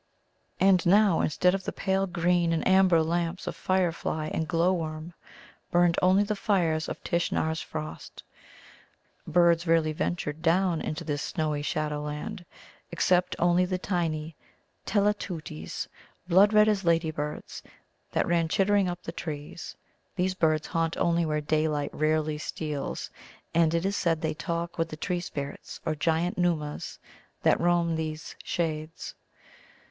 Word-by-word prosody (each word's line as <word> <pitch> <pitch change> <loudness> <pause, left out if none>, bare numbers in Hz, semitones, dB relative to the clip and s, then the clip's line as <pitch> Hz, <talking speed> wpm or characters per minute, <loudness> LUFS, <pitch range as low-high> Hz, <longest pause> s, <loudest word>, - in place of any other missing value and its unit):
And 190 -2 +5
now, 195 -1 +4
instead 180 +4 +2
of 195 -1 -2
the - - -2
pale 195 0 0
green 175 -1 +1
and 165 - 0
amber 185 -3 +5
lamps 170 +2 -1
of - - -4
firefly 170 -4 -1
and 160 - -1
glowworm, 165 -1 0 0.6
burned 175 -1 +3
only 185 +2 +5
the 210 +1 -2
fires 170 -6 +1
of - - -7
Tishnar's 160 -2 0
frost. 75 +1 -7 1.0
Birds 170 +1 +3
rarely 160 -1 +3
ventured 155 -1 -3
down 175 0 +2
into 150 - -4
this 145 -2 -2
snowy 155 -3 -2
shadowland, 150 +6 -3 0.5
except 180 0 +2
only 175 +1 +3
the 180 0 -1
tiny 165 -4 -2 0.5
Telateuties, 190 - -2 0.4
blood 190 +4 +6
red 210 0 +6
as 205 -2 +1
ladybirds, 160 -3 -1 0.5
that - - +1
ran 170 -1 +2
chittering 195 +2 +2
up 175 0 -6
the - - -5
trees. 150 0 -7 0.4
These 185 0 0
birds 155 -3 +1
haunt 165 -1 -1
only 170 -1 +2
where 150 0 0
daylight 150 -1 0
rarely 155 0 0
steals, 150 -2 -4 0.4
and 165 -1 +4
it 170 +2 0
is 200 +1 0
said 165 -3 +1
they 155 -1 -1
talk 170 +2 -4
with 165 0 0
the 155 - -7
tree 180 +2 -1
spirits, 140 -5 -6
or 160 - +1
giant 165 +4 0
Nōōmas, 160 -4 -1 0.5
that - - +3
roam 170 -1 +2
these 155 -1 -5
shades. 160 -1 -3
170 Hz, 140 wpm, -28 LUFS, 155-180 Hz, 1.0 s, blood